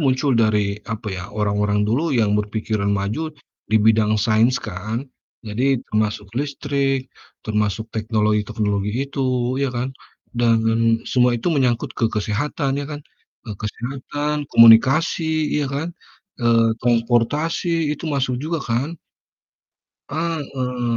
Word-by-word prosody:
muncul 135 0 +2
dari, 105 -2 +1
apa 110 -1 -4
ya, 90 -1 -5
orang-orang 105 0 +1
dulu 145 +8 +1
yang 110 -3 +2
berpikiran 105 -1 -2
maju 105 +11 -2 0.4
di 110 - +3
bidang 110 0 +3
sains 115 +4 +3
kan. 110 +5 -4 0.4
Jadi, 120 +5 0
termasuk 105 -1 -1
listrik, 140 -2 -1 0.4
termasuk 105 +1 -1
teknologi-teknologi 105 -2 0 0.2
itu, 130 -2 -1
ya 140 - +1
kan, 125 +2 -2 0.5
dan 115 -1 +4 0.5
semua 125 -1 +3
itu 120 +9 -1
menyangkut 125 -6 +1
ke 115 - +3
kesehatan, 135 +6 -1
ya 140 - -5
kan. 150 -1 -6 0.4
Eee, 105 -4 -6
kesehatan, 140 +6 -4
komunikasi, 150 +7 +5
ya 145 - 0
kan, 140 +4 -3 0.5
eee, 115 -1 +4
transportasi 145 +8 +1
itu 150 - -7
masuk 135 -4 0
juga 160 +2 -2
kan. 130 +8 -1 1.1
Heeh, 135 -7 -2
120 Hz, 115 wpm, -21 LUFS, 110-140 Hz, 1.1 s, komunikasi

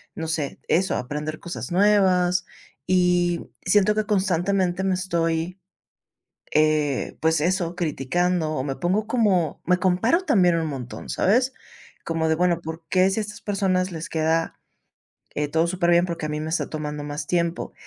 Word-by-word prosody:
no 160 - -4
sé, 160 -3 -2
eso, 185 +3 +2
aprender 150 +4 -4
cosas 175 +1 -6
nuevas. 185 -2 +3 0.4
Y 180 -1 +2 0.2
siento 205 +2 +3
que 215 0 0
constantemente 190 -2 +1
me 190 -1 +1
estoy, 170 -1 -1 0.9
eh, 155 -3 +1
pues, 160 -1 +2
eso, 175 +1 0
criticando, 170 +1 0
o 130 -4 -2
me 135 -1 -3
pongo 195 +5 0
como 205 - +1
me 180 +1 +3
comparo 185 - +2
también 180 - +3
un 165 -1 -1
montón, 125 -6 -7
¿sabes?, 250 +7 +2 0.5
como 165 -1 -1
de, - - +4
bueno, 170 0 +1
¿por 160 +1 -7
qué, 185 +2 +3
si 195 - -1
a - - 0
estas 210 0 -8
personas 190 -2 0
les 165 +2 -6
queda, 160 -1 0 0.8
eh, 150 - 0
todo 160 +3 +1
superbién, 175 -1 +3
por 170 -2 -4
qué 155 - -3
a - - -5
mí 150 0 -3
me 155 - -4
está 165 - -1
tomando 150 -1 -5
más 145 0 -5
tiempo? 170 -1 -1
175 Hz, 165 wpm, -24 LUFS, 160-185 Hz, 0.9 s, de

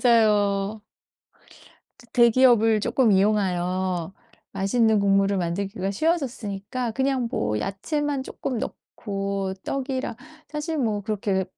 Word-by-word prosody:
맞아요. 210 -3 +2 1.2
저 240 - -18
대기업을 235 -2 +5
조금 235 +1 +2
이용하여 185 -3 +1 0.4
맛있는 215 +2 +2
국물을 195 0 +3
만들기가 190 +3 -2
쉬워졌으니까 240 - -2
그냥 265 -1 0
뭐 105 0 -1
야채만 285 +8 -2
조금 260 -1 -4
넣고 195 -3 -4
떡이랑 265 -2 -3 0.3
사실 305 +1 -3
뭐 220 -5 0
그렇게 195 -2 -1
210 Hz, 255 characters per minute, -24 LUFS, 195-250 Hz, 1.2 s, 대기업을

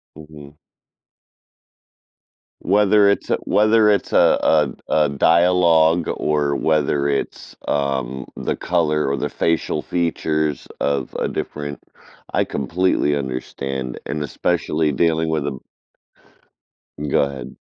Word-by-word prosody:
Mhm. 75 -1 -13 2.1
Whether 105 +1 +4
it's 100 - 0
a - - +3
whether 110 0 +3
it's 100 -3 +1
a - - +3
a - - -6
a - - +1
dialogue 85 +2 +3
or 75 -2 0
whether 75 -2 +1
it's, 70 - -4
um, 65 -2 -2
the - - -2
color 75 -4 0
or 70 - 0
the 75 +1 -3
facial 85 -1 -1
features 75 -4 -2
of 70 -3 -2
a - - 0
different 75 -1 -5 0.5
I - - +2
completely 75 +1 0
understand, 65 -1 -4
and 75 +1 -4
especially 80 0 -1
dealing 80 +2 +1
with 75 -3 -1
a 65 -3 -4 1.5
Go - - +2
ahead. 70 -3 -5
75 Hz, 110 wpm, -20 LUFS, 70-85 Hz, 2.1 s, Whether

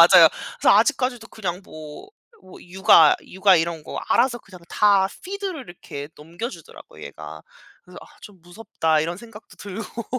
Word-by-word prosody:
맞아요. - - +9 0.3
그래서 - - +5
아직까지도 255 -5 +1
그냥 185 -4 -5
뭐 155 - -11 0.3
뭐 185 - -15
육아 175 -4 +5
육아 190 -1 +3
이런 165 -1 -2
거 - - -8
알아서 240 +1 +3
그냥 190 -6 -15
다 200 -2 +3
피드를 385 -5 -5
이렇게 145 -4 -9
넘겨주더라고요 170 - -10
얘가. - - -10 0.4
그래서 - - -17
'아 - - -15
좀 195 -5 -15
무섭다.' 175 -4 -1
이런 170 +3 -3
생각도 225 +1 -14
들고. 210 +3 -7
190 Hz, 340 characters per minute, -22 LUFS, 170-230 Hz, 0.4 s, 맞아요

